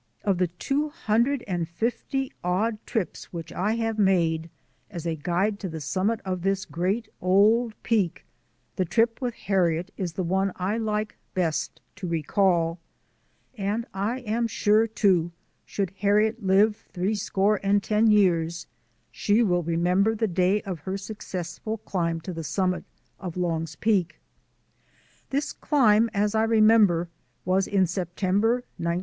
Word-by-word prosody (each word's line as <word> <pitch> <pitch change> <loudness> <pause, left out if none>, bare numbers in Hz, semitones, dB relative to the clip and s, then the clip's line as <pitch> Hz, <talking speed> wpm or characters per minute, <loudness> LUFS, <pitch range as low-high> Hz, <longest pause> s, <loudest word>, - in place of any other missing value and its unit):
Of 195 -3 +1
the 180 - +3
two 275 - -2
hundred 240 0 0
and 175 -3 -2
fifty 245 +7 -2
odd 210 +5 0
trips 220 -7 -3
which 165 -2 -7
I 210 +5 0 0.2
made 170 -5 +2 0.4
as 175 -5 -7
a 165 - 0
guide 180 +7 -1
to 190 - -4
the 160 -1 -6
summit 190 +9 -1
of 185 -2 -2
this 195 +1 0
great 195 +6 -1
old 215 +5 +3
Peak, 195 -7 0 0.5
the 185 - +2
trip 225 +8 +1
with 245 -2 -2
Harriet 180 -1 0
is 180 -4 -3
the 185 - -2
one 190 +2 0
I 195 +5 -1
like 215 -1 -2 0.2
best 170 -4 -1 0.2
to 195 -3 -5
recall; 170 +1 +1 0.8
and 210 +2 -2
I 210 +7 -2
am 230 0 -1
sure, 215 0 +3
too, 190 -6 +2 0.3
should 195 -3 -2
Harriet 210 +3 +2
live 200 +3 +4
three 190 +2 -1
score 205 0 +1
and 200 0 +2
ten 215 +1 +3
years 170 -5 +2 0.5
she 215 +3 +2
will 175 -4 +2
remember 180 +6 +1
the 225 +1 0
day 185 +2 +1
of 185 -4 -5
her 190 +6 -4
successful 195 0 -5
climb 170 -5 -2
to 180 +2 -6
the 165 -1 -5
summit 185 +3 -1 0.3
of 180 -2 -6
Long's 165 -3 -2
Peak. 195 -5 0 1.1
This 280 +2 -1
climb, 230 -6 +3
as 205 0 0
I 220 - +2
remember, 215 -6 +4 0.4
was 185 +1 +2
in 195 -2 +3
September, 190 +6 0 0.2
1905. 170 +1 0
195 Hz, 145 wpm, -26 LUFS, 175-215 Hz, 1.1 s, live